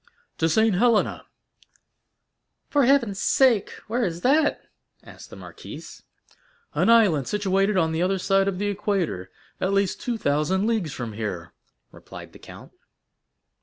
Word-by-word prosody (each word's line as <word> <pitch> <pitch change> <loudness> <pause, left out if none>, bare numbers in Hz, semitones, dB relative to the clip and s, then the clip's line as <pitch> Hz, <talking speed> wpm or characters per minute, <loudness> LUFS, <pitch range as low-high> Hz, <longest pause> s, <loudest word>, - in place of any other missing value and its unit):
"To 165 - +2
Saint 220 +5 +3
Helena." 230 0 +1 1.4
"For 285 -3 +3
heaven's 235 -7 +2
sake, 250 -7 +3 0.2
where 240 +3 -1
is 170 -4 -3
that?" 290 - +2 0.4
asked - - -14
the - - -11
marquise. - - -11 0.7
"An - - +1
island 200 - +4
situated 195 0 0
on 160 -3 +2
the 160 +1 -2
other 190 +2 +1
side 195 +1 +1
of 195 -2 -2
the 205 - -2
equator, 195 - -2 0.3
at 190 +1 -1
least 200 -1 0
two 240 -2 -2
thousand 165 +4 0
leagues 220 -9 -1
from 120 -5 -6
here," 95 -6 -5 0.4
replied - - -12
the - - -14
count. - - -13
195 Hz, 140 wpm, -24 LUFS, 165-225 Hz, 1.4 s, island